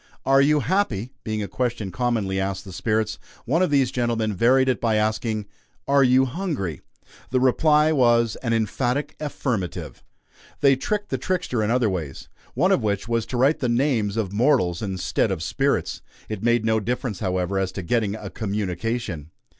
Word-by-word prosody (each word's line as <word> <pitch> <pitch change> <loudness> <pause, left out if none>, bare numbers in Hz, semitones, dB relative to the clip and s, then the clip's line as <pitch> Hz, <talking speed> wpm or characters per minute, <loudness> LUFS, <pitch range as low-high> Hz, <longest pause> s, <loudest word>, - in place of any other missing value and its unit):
"Are 135 0 +5
you 150 +1 +3
happy?" 130 - 0
being 110 -1 -2
a - - -4
question 120 -6 -2
commonly 110 -3 -1
asked 95 0 -3
the 95 - -9
"spirits," 110 +3 -1 0.3
one 160 +8 +1
of 185 - +3
these 135 -3 +2
gentlemen 115 -4 0
varied 130 +7 +3
it 130 -3 0
by 115 -2 +2
asking: 110 0 0 0.4
"Are 140 0 +4
you 130 +1 +5
hungry?" 130 - -3 0.5
The 130 - +1
reply 150 +4 +4
was, 120 -5 +3
an 115 - -3
emphatic 120 +5 -1
affirmative. 125 - -4 0.6
They 140 -2 +5
tricked 205 +10 -2
the - - -2
trickster 180 -11 -1
in 105 - 0
other 120 -1 +2
ways; 80 -8 -4 0.3
one - - +3
of - - +3
which 100 -1 -1
was 115 -1 -1
to 125 - -3
write 135 +5 +3
the 125 - 0
names 120 -5 +1
of 100 -4 -2
mortals 110 - +2
instead 95 +1 -1
of 90 -4 -2
spirits. 75 - -1 0.3
It 105 -3 -4
made 120 -1 +2
no 110 0 +2
difference, 120 -1 -3
however, 95 -1 -1
as 95 -1 -1
to 95 - -5
getting 105 +2 0
a 110 - -7
"communication." 100 -4 -3
115 Hz, 175 wpm, -23 LUFS, 100-130 Hz, 0.6 s, Are